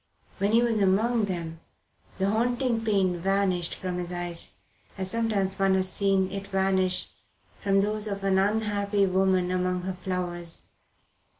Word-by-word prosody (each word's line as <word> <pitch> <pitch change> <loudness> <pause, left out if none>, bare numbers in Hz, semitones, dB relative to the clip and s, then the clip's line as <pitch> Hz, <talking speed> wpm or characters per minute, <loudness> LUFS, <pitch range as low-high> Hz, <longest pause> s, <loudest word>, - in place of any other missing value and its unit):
When 200 +2 +1
he 235 +1 +5
was 230 -2 +1
among 215 +4 +2
them 170 -4 -4 0.6
the 195 +1 +1
haunting 240 +1 0
pain 190 -5 +1
vanished 185 -2 0
from 180 -1 -4
his 175 0 -4
eyes, 175 -1 -5 0.4
as 190 -1 -3
sometimes 200 -4 0
one 195 -1 +3
has 185 0 +1
seen 195 -1 +1
it 195 0 -5
vanish 190 -1 +1 0.5
from 195 -1 +3
those 210 +1 0
of 200 -1 -4
an 190 -1 +3
unhappy 205 0 +1
woman 185 -1 +2
among 180 0 0
her 190 +1 -3
flowers. 180 -2 -4
195 Hz, 145 wpm, -27 LUFS, 185-205 Hz, 0.6 s, he